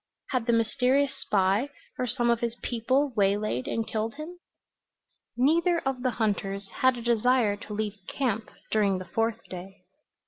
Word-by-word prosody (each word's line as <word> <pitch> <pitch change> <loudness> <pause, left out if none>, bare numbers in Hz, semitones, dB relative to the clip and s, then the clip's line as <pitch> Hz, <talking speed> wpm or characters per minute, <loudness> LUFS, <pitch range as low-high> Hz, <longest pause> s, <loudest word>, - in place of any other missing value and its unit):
Had 250 -3 0
the 235 - +4
mysterious 255 +4 +2
spy, 200 +6 +1 0.3
or 250 - 0
some 240 0 +2
of 235 - +2
his 235 -1 -2
people, 255 +4 +1
waylaid 200 - +1
and 225 -1 -1
killed 220 0 -2
him? 325 +4 -8 1.0
Neither 335 +7 +3
of 265 -2 -1
the 255 - +2
hunters 200 -3 -1
had 260 -1 +4
a 235 - -6
desire 235 -2 +3
to 210 - -8
leave 210 -1 -3
camp 225 -5 -1 0.2
during 200 -3 +3
the 185 - -6
fourth 225 +2 -1
day. 185 +1 -9
230 Hz, 160 wpm, -28 LUFS, 205-255 Hz, 1.0 s, the